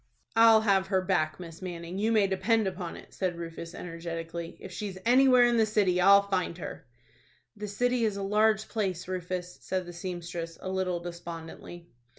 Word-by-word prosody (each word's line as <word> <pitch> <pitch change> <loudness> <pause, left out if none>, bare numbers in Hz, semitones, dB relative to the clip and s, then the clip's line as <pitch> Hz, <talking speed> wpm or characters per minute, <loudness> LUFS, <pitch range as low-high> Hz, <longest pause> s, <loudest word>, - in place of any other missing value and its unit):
"I'll 225 -1 +7
have 195 -3 +2
her 190 -1 +2
back, 180 -5 0
Miss 165 -1 -9
Manning, 175 0 -5
you 220 +2 +1
may 215 -3 +4
depend 200 +4 +1
upon 180 -2 -4
it," - - -14
said 185 -2 -1
Rufus, 165 0 -7
energetically. 165 0 -6
"If 190 - -9
she's 195 0 -5
anywhere 255 0 +6
in 240 -1 +3
the 220 - +5
city 195 -4 +2
I'll 200 +2 +7
find 185 -3 -1
her." 160 - -8 0.7
"The 210 0 -6
city 245 +4 0
is 210 -3 0
a 200 - -3
large 215 +1 +2
place, 190 -6 -2
Rufus," 180 -1 -4
said 185 -1 -2
the 175 - -9
seamstress, 175 -2 -5
a 185 - -6
little 185 -2 -1
despondently. 170 0 -9
185 Hz, 175 wpm, -29 LUFS, 175-210 Hz, 0.7 s, I'll